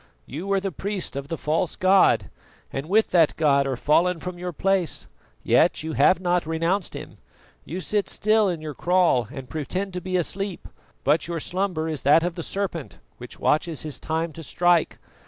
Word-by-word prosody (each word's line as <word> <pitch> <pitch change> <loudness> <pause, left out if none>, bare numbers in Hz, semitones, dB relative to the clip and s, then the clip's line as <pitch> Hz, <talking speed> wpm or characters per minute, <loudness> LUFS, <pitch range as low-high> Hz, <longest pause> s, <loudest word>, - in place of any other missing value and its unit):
You 160 +9 -6
were 200 0 +2
the 195 0 -3
priest 190 -2 -4
of 140 0 -5
the 165 - -4
false 155 +3 -1
god, 190 +1 +4 0.4
and 135 +4 -4
with 220 +3 +3
that 165 -4 +4
god 140 -3 +3
are 130 -2 -2
fallen 170 +6 +2
from 180 +1 -6
your 180 0 -4
place, 190 +1 0 0.4
yet - - +3
you 160 0 -4
have 150 +6 +4
not 175 -3 0
renounced 165 +4 -1
him. - - -9 0.5
You 180 +4 -5
sit 205 +2 -1
still 215 -1 +2
in 170 -3 -3
your 155 -1 -5
kraal 170 - +2
and 135 -3 -8
pretend 180 +7 -4
to 180 - -4
be 185 +1 -1
asleep, 195 +2 -3 0.4
but 150 +4 +2
your 170 -1 -3
slumber 180 -1 -2
is 155 -3 -3
that 150 +4 +5
of 175 0 -1
the 170 - -6
serpent 180 -4 -4 0.2
which 125 - -10
watches 155 0 0
his 155 -2 -5
time 160 0 -2
to 165 - -9
strike. 175 +1 +2
170 Hz, 190 wpm, -24 LUFS, 155-185 Hz, 0.5 s, that